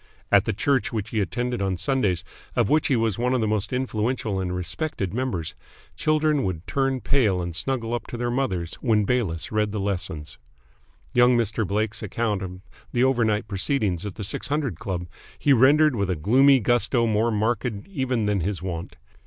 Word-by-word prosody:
At 100 0 +5
the 110 - +1
church 135 +6 +1
which 105 -3 -3
he 110 - +1
attended 120 +4 -2
on 95 -2 0
Sundays, 95 -4 +1 0.3
of 120 -4 +2
which 155 0 +3
he 135 - +2
was 115 -3 0
one 125 +2 +1
of - - +1
the 110 - +1
most 105 -2 -1
influential 120 -4 -1
and 90 -1 -2
respected 90 - -3
members, 115 -10 -2 0.4
children 155 -2 +2
would 90 -2 -3
turn 135 +5 0
pale 110 -10 +2
and 85 -2 -4
snuggle 120 +3 -1
up 120 - -3
to 120 - -6
their 120 0 -1
mothers 95 -10 -1
when 110 -3 +3
Bayliss 100 -9 -1
read 105 -1 +1
the 105 - -3
lessons. 90 -6 -3 0.7
Young 120 0 +5
Mr. 110 -2 0
Blake's 105 +2 -1
account 105 -1 -1
of 90 -1 -7 0.3
the 120 - +2
overnight 115 -5 +2
proceedings 100 - -1
at 105 -3 -5
the 105 - -5
Six 95 - -1
Hundred 140 - -1
Club 90 -3 -3 0.3
he 145 - +3
rendered 145 +3 +5
with 100 -3 -1
a 90 - +1
gloomy 130 - +5
gusto 120 +1 +2
more 110 +1 +2
marked 115 +3 0 0.2
even 130 - -1
than 105 -1 +1
his 95 +1 -2
wont. 85 -1 -5
110 Hz, 185 wpm, -24 LUFS, 95-125 Hz, 0.7 s, At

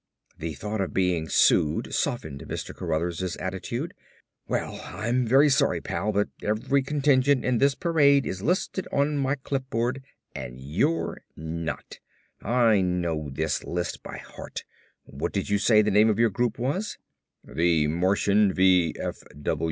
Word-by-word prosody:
The 80 -1 -4
thought 105 +7 -3
of 95 - -3
being 90 -4 +1
sued 75 0 +3
softened 80 - -2
Mr. - - -5
Cruthers' 85 +2 -2
attitude. 95 0 -4 0.5
"Well, - - -3
I'm 120 +3 -1
very 135 +5 +6
sorry, 135 - +2
pal, 105 - -2
but 105 0 +1
every 110 +6 +1
contingent 140 -1 +2
in 125 -2 +2
this 140 0 +3
parade 145 -5 +3
is 95 - -4
listed 180 - -1
on 145 +1 +1
my 140 0 +1
clipboard 130 -2 -2 0.3
and 60 +1 -7
you're 85 - -1
not. 80 +1 -5 0.4
I 115 -3 +3
know 85 -5 -1
this 75 +2 -1
list 90 0 -3
by - - -8
heart. - - -8 0.4
What - - -5
did - - -2
you 100 - +3
say 110 0 +5
the 105 - +1
name 105 +2 +5
of 105 - +1
your 115 -1 +3
group 120 +3 -1
was?" 150 - -2 0.5
"The 80 -2 +1
Martian 95 +5 +2
V. 90 -3 +4
105 Hz, 145 wpm, -26 LUFS, 85-130 Hz, 0.5 s, very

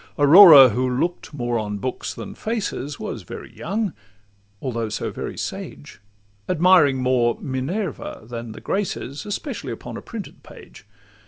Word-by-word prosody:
Aurora, 145 -2 +9
who 125 +4 -1
look'd 155 +8 -2
more 120 -5 -2
on 105 -1 -4
books 130 +5 -4
than 200 - -8
faces, 205 - -4
Was - - -5
very - - -10
young, 200 +1 -2 0.7
although 115 -4 -3
so 105 - -3
very - - -6
sage, 75 +10 -7 0.5
Admiring 175 -5 +4
more 125 -2 +1
Minerva 145 +7 -4
than 115 0 -7
the 110 - -11
Graces, 185 -7 -3
Especially 205 - -5
upon 115 - -7
a - - -8
printed - - -9
page. - - -15
135 Hz, 140 wpm, -22 LUFS, 120-180 Hz, 0.7 s, Aurora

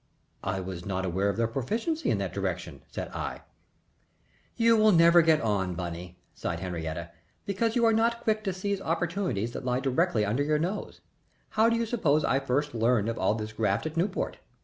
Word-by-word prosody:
"I 95 0 -1
was 90 -2 -6
not 95 -1 -2
aware 95 +3 0
of 100 - -2
their 115 - +2
proficiency 225 - -2
in - - +2
that - - -3
direction," - - -3
said - - -5
I. - - -5 1.1
"You 230 -1 +4 0.2
never 170 -1 +7
will 165 - +4
get 160 -1 +5
on, 95 -5 0
Bunny," 85 +1 -6 0.2
sighed 85 - -3
Henriette, 85 -1 -5 0.3
"because 220 +3 0
you 235 -1 +3
are 225 - +5
not 230 +1 +2
quick 215 -1 +1
to 195 - +1
seize 195 +1 -2
opportunities 170 - -1
that - - -6
lie 125 0 0
directly 135 - +1
under 110 +7 0
your 150 +1 +2
nose. 180 +7 -3 0.5
How 220 +1 +3
do 230 - +2
you 230 0 0
suppose 155 - +2
I 135 - +2
first 140 +2 -1
learned 115 -1 +2
of 115 - -3
all 100 +3 +2
this 110 -1 -5
graft 105 +1 0
at 160 0 -4
Newport? 185 +4 -1
135 Hz, 195 wpm, -28 LUFS, -, 1.1 s, never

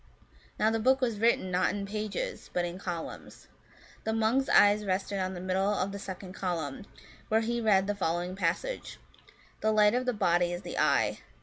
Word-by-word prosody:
Now 220 - +3
the 225 - 0
book 260 +4 +3
was 235 -5 -1
written, 225 -4 +2
not 180 +1 +2
in 200 -1 -3
pages, 215 - -4
but 175 -1 +1
in 175 +1 -6
columns. 175 -4 -7 0.6
The 220 - -1
monk's 225 +5 +1
eyes 205 +1 +5
rested 195 0 -1
on 185 0 -2
the - - -6
middle 190 +2 0
of 195 0 -1
the 200 - -6
second 190 -1 -7
column, 175 -2 -3 0.4
where 220 +1 +3
he 235 +1 -1
read 200 -4 +4
the 205 - 0
following 175 -1 -2
passage, 190 - -2 0.3
* - - -27
The 220 - +2
light 210 0 +5
of 250 +1 0
the - - +3
body 175 -4 +2
is 175 +2 -5
the - - -4
eye. - - +2
200 Hz, 195 wpm, -29 LUFS, 185-220 Hz, 0.6 s, eyes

